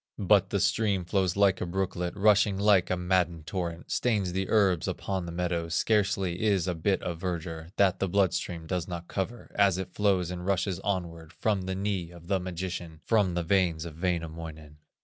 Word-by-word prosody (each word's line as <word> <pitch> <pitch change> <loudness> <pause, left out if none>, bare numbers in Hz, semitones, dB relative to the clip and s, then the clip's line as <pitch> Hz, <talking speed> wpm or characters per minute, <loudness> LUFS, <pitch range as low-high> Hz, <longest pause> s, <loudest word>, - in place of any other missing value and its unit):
But 100 -1 +3
the 100 - 0
stream 100 -2 +1
flows 95 -1 +1
like 100 -2 +3
a - - 0
brooklet, 90 -1 -2
Rushing 100 -1 +4
like 100 -2 +4
a 90 - +1
maddened 90 -3 0
torrent, 85 0 -4
Stains 105 -7 +1
the 95 0 -2
herbs 95 -6 +3
upon 95 -3 -3
the - - -5
meadows, 85 -1 -2
Scarcely 95 -4 +1
is 100 -5 +2
a 90 - +1
bit 95 +4 0
of 85 -2 -4
verdure 85 -2 -4
That 95 -2 +3
the 95 - 0
blood 95 0 +3
stream 85 -2 -3
does 90 0 -2
not 85 -1 -6
cover 110 +5 -4
As 100 -3 +3
it 95 -1 -5
flows 95 -4 +1
and 90 -1 -5
rushes 95 -1 0
onward 85 -5 -3
From 100 +4 0
the 95 0 -3
knee 95 -3 -2
of 85 -1 -13
the 95 -2 +2
magician, 90 -2 -5
From 100 -6 +2
the 90 - 0
veins 85 -3 +1
of 80 0 -9
Wainamoinen. 80 -4 -4
90 Hz, 190 wpm, -28 LUFS, 85-100 Hz, -, Rushing